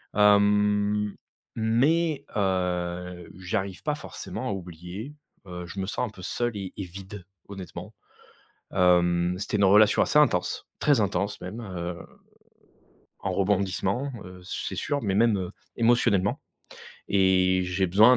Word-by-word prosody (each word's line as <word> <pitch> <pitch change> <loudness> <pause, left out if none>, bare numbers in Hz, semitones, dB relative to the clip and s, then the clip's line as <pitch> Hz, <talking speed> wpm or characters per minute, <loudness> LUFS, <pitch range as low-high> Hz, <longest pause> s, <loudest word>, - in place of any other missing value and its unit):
hem, 105 0 +3 0.4
mais, 145 +8 +2
heu, 90 -2 -1
j'arrive 95 +1 -3
pas 150 -1 -1
forcément 130 -3 -6
à - - -1
oublier, 90 - -7 0.3
heu, 90 0 -6
je 95 +3 -7
me 95 - -2
sens 125 - -1
un - - -7
peu 95 - -13
seul 120 +4 -2
et 95 -2 -5
et 100 - -3
vide, 95 +1 -9 0.2
honnêtement, 95 -3 -8 0.8
hem, 90 -1 +3
c'était 105 +1 -1
une 100 - +2
relation 105 +2 +6
assez 150 - +3
intense, 90 -12 +1
très 145 -7 +3
intense 100 +1 -1
même, 100 +6 -6
heu, 90 -4 -5 1.2
en 95 - -2
rebondissements, 100 +6 0
heu, 90 0 -11
c'est - - -4
sûr, 145 -1 -1
mais 100 -6 -1
même, 110 -1 +4
heu, 90 -1 -4 0.3
émotionnellement 115 -4 +3 0.7
et 95 -1 +3
j'ai 90 +1 0
besoin 110 +8 +6
100 Hz, 135 wpm, -26 LUFS, 90-105 Hz, 1.2 s, relation